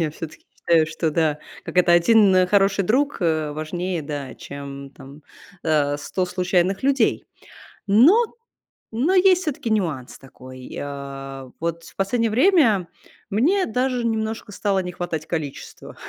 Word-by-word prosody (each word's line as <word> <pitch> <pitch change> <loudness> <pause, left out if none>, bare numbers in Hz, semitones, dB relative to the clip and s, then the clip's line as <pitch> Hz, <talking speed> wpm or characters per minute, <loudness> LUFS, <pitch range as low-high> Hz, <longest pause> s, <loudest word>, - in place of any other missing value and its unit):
Я 155 -2 0
всё-таки 160 0 -10
считаю, 165 -2 +3
что 160 +1 -2
да, 155 -1 +1 0.3
как - - -8
это: 175 -1 +5
1, 195 +3 +5
э, 185 0 +4
хороший 195 0 +2
друг, 280 +8 +1
э, 155 -3 0
важнее, 175 +4 -3
да, 145 -3 -6
чем 140 -1 -9
там, 140 +2 -14 0.4
э, 145 -2 +1
100 185 +5 -2
случайных 180 +1 0
людей. 265 -4 +1 0.6
Но 240 - +6 0.8
но 270 +11 +1
есть 370 -1 +4
всё-таки 285 -7 -3
нюанс 165 - -2
такой, 130 -1 -12
э. 135 -1 -7
Вот 170 0 -3
в - - -15
последнее 230 +4 0
время 235 - +3 0.4
мне 310 - +2
даже 250 +1 -1
немножко 220 -1 -2
стало 200 -1 0
не 180 -1 -4
хватать 165 -3 -4
количества. 155 -5 -6
180 Hz, 140 wpm, -22 LUFS, 150-220 Hz, 0.8 s, Но